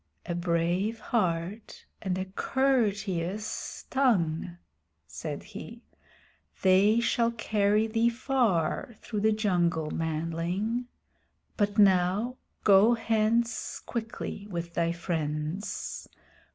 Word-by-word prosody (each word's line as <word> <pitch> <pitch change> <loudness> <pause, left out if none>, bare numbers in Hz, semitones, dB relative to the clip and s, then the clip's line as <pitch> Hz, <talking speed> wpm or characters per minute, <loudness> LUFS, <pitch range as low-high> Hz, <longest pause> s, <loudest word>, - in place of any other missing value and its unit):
"A - - -2
brave 175 +5 0
heart 195 -1 -2 0.2
and 185 -3 -1
a 185 - -2
courteous 205 -4 -1
tongue," 180 - +1 0.5
said - - -6
he. - - -10 0.8
"They 195 +4 +5
shall 235 0 +2
carry 215 -2 +1
thee 225 +1 +2
far 235 - 0
through 215 - -3
the 220 +1 +4
jungle, 175 -7 +1
manling. 165 +9 -2 0.7
But 205 0 0
now 200 +5 +3 0.3
go 210 +4 +6
hence 225 +1 0
quickly 220 -3 -5
with 170 -2 -4
thy 170 0 +1
friends. 160 +1 -3
200 Hz, 95 wpm, -28 LUFS, 170-225 Hz, 0.8 s, go